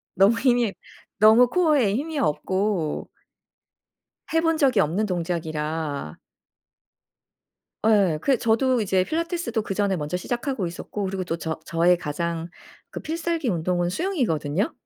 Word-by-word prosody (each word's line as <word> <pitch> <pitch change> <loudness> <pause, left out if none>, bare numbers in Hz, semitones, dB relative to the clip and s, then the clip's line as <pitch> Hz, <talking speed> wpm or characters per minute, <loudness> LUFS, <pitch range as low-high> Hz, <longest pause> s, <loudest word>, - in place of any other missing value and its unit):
너무 200 +5 +4
힘이 240 -5 +2 0.5
너무 220 +3 +7
코어에 285 - +2
힘이 300 +4 -3
없고 190 - -1 1.2
해 325 - +3
본 325 -1 +1
적이 260 -8 +3
없는 190 +8 +1
동작이라 160 - -3 1.7
예 195 -8 +4
그 270 - +2
저도 235 +3 +2
이제 190 -3 +2
필라테스도 330 - -2
그전에 200 -1 0
먼저 150 +2 -3
시작하고 240 0 -3
있었고 195 +4 -5
그리고 190 -1 -3
또 165 -2 -2
저 160 -1 -4
저의 170 +2 +3
가장 170 +1 -3 0.4
그 - - -6
필살기 330 -2 -2
운동은 175 -1 0
수영이거든요. 195 - -1
200 Hz, 275 characters per minute, -24 LUFS, 170-255 Hz, 1.7 s, 너무